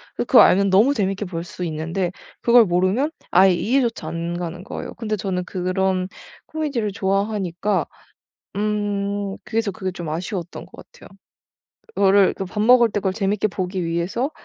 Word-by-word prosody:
그걸 - - +5
알면 200 +1 +5
너무 220 +9 +5
재밌게 195 -1 -1
볼 170 -2 -5
수 185 0 -7
있는데 165 +3 -2 0.3
그걸 235 -1 +6
모르면 185 - +1 0.2
아예 185 +1 +6
이해조차 235 -2 0
안 170 +1 -4
가는 175 +1 -5
거예요. - - -6
근데 215 -2 -2
저는 185 -2 -2
그런 185 0 -1 0.4
코미디를 275 -10 -2
좋아하니까 195 -2 -1 0.7
음 205 -1 -2
그래서 225 -2 -1
그게 190 -1 -4
좀 175 -3 -7
아쉬웠던 175 +2 -5
거 - - -13
같아요. - - -17 0.9
그거를 195 0 +4
그 195 - -4
밥 210 +3 -4
먹을 240 +1 +6
때 205 - -2
그걸 190 -1 0
재밌게 205 +1 0
보기 185 -2 -3
위해서 170 - -1
195 Hz, 330 characters per minute, -22 LUFS, 180-210 Hz, 0.9 s, 그걸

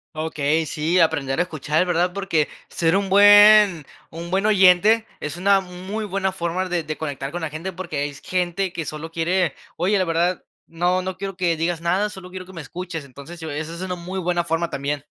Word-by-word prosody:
Okey, 155 0 0
sí, 160 +4 0
aprender 145 -4 +1
a 175 - +4
escuchar, 155 +1 -1
¿verdad? 175 +1 +1
Porque 195 -6 0 0.2
ser 165 +2 +1
un 195 -1 0
buen 205 -4 +7 0.2
un 170 +2 -8
buen 195 +2 +1
oyente 205 +3 +5
es 150 +3 -5
una 195 +2 +4
muy 190 +4 -6
buena 190 -1 -1
forma 185 0 -2
der 175 -3 -1
de 155 - -4
conectar 140 -2 -5
con 175 - -5
la 160 - -3
gente. 165 +5 -5
Porque 165 -6 -3
es 145 0 -11
y - - -14
gente 180 +1 -1
que 160 -3 -4
solo 155 +2 -6
quiere: 175 +2 0 0.2
"Oye, 195 +5 +1
la 185 - +1
verdad, 170 +2 0 0.2
no, 175 +2 0
no 185 0 -5
quiero 195 -1 -5
que 175 -3 +1
digas 165 0 -1
nada, 190 +5 +1
solo 190 -2 -10
quiero 185 -1 -7
que 190 - -14
me 165 - -7
escuches", 170 0 -7
entonces, 140 +6 -11
yo 160 -2 -6
esa 155 +3 -5
es 170 - -8
una 185 -1 -3
muy 180 +2 -6
buena 175 -1 0
forma 170 0 -1
también. 140 +1 -3
175 Hz, 215 wpm, -22 LUFS, 160-185 Hz, 0.2 s, buen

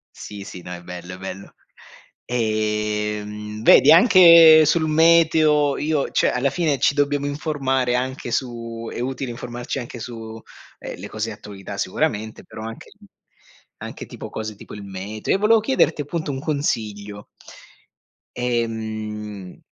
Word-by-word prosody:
Sì, 105 -1 -9
sì, 95 -2 -9
no, 90 0 -8
è 85 - -8
bello, 90 0 -9
è - - -12
bello. 95 +1 -8 0.8
Ehm, 105 -2 -2
vedi, 140 - +7
anche 165 -5 +8
sul 160 +1 +2
meteo 155 -2 +4
io 150 -2 -1
cioè, - - +2
alla 130 +2 0
fine 155 -1 0
ci - - +3
dobbiamo 145 0 0
informare 135 -4 -1
anche 130 -1 -3
su 115 -2 -4
è - - -6
utile 130 0 -3
informarci 120 +2 -5
anche 120 -1 -8
su, 115 -1 -8 0.4
ehm, - - -8
le - - -7
cose 110 +1 -4
attualità 100 -2 -9
sicuramente, 110 +1 -2
però 110 - -10
anche 115 0 -9 0.9
anche - - -8
tipo - - -9
cose 110 -1 -6
tipo - - -13
il 105 -1 -8
meteo. 100 - -3
E - - +2
volevo 215 +3 +4
chiederti 210 - +1
appunto 150 +1 -4
un 135 - -4
consiglio. 105 -9 -3 1.1
Ehm 110 -4 -4
120 Hz, 140 wpm, -22 LUFS, 105-145 Hz, 1.1 s, anche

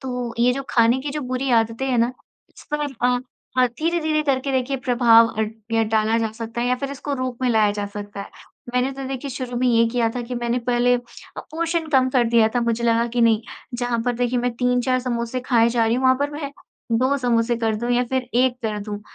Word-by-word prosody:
तो 250 -3 -4
ये 245 +1 +4
जो 275 +2 -3
खाने 235 +2 +4
की 285 +2 -4
जो 300 +2 -3
बुरी 255 0 -2
आदतें 230 +2 +1
हैं 250 -3 +1
ना, 235 +2 +2 0.5
इस - - -14
पर 300 - 0 0.2
अ 245 0 +3 0.4
अ, 255 - +6
धीरे-धीरे 310 +4 -1
करके 275 -1 0
देखिए 260 +1 0
प्रभाव 240 -3 +5
अ, 220 -1 -2 0.3
या 225 0 +3
डाला 220 +1 +1
जा 225 -1 -1
सकता 230 +1 -6
है 240 - 0
या 250 - +3
फिर 275 +2 -4
इसको 280 +1 -5
रूप 255 -2 -4
में 250 - +2
लाया 215 -2 +3
जा 205 0 -3
सकता 205 0 -7
है। 200 - -7 0.5
मैंने 250 +2 +2
तो 270 0 -7
देखिए 270 +1 -5
शुरू 250 -1 -5
में 255 - +1
ये 230 -1 +4
किया 235 -1 +1
था 245 - -2
कि 245 +1 -6
मैंने 240 0 -1
पहले 245 0 +2
अ, - - -5 0.4
पोर्शन 330 0 -2
कम 265 -3 +3
कर 250 -2 +3
दिया 230 -1 +4
था। 245 - +2
मुझे 235 0 -1
लगा 230 0 +2
कि 240 +1 -2
नहीं, 230 -1 +4 0.3
जहाँ 245 -1 -1
पर 245 - +1
देखिए 245 +1 0
मैं 245 +1 0
3-4 250 +1 +1
समोसे 240 0 -2
खाए 235 -2 +3
जा 235 -1 +1
रही 225 - +2
हूँ, 255 - -1
वहाँ 260 0 +5
पर 285 +1 0
मैं 290 -1 -5 0.4
2 255 +5 +2
समोसे 240 -1 +1
कर 225 -2 0
दूँ 240 +3 -3
या 245 - +3
फ़िर 260 +1 -1 0.2
1 255 -1 +2
कर 215 -1 -2
दूँ। 205 0 -6
245 Hz, 240 wpm, -22 LUFS, 230-260 Hz, 0.5 s, अ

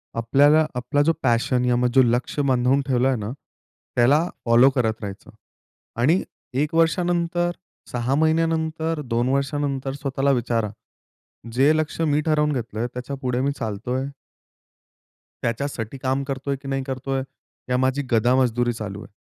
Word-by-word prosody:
आपल्याला 145 +7 +4
आपला 125 +4 0
जो 165 - +3
पॅशन 125 0 +2
या 125 -1 +2
मग 125 +1 +2
जो 135 - +8
लक्ष्य 120 +4 0
बांधून 130 +1 +3
ठेवलंय 130 0 +2
ना 105 -1 -4 0.6
त्याला 140 +8 +4 0.2
फॉलो 120 +3 +6
करत 125 -5 0
राहायचं. 100 -2 -7 0.7
आणि 160 +9 +3 0.3
1 145 +4 0
वर्षानंतर, 175 +1 +1 0.4
6 125 +2 0
महिन्यानंतर, 160 0 +1
2 120 -2 -1
वर्षानंतर 140 0 -1
स्वतःला 140 0 0
विचारा, 115 -4 0 0.8
जे 140 +5 +4
लक्ष्य 155 +1 -1
मी 150 -1 +2
ठरवून 150 -1 +2
घेतलंय 115 -2 -3
त्याच्यापुढे 125 0 -3
मी 140 +1 +1
चालतोय? 120 +4 -3 1.4
त्याच्यासाठी 115 0 -3
काम 130 +1 -1
करतोय 140 0 -2
की 140 - -9
नाही 135 0 -1
करतोय? 135 0 -3 0.5
या 125 - +2
माझी 130 +2 +1
गधा 120 +2 +3
मजदुरी 120 -2 +1
चालू 105 -3 -6
आहे. - - -14
130 Hz, 135 wpm, -23 LUFS, 120-145 Hz, 1.4 s, जो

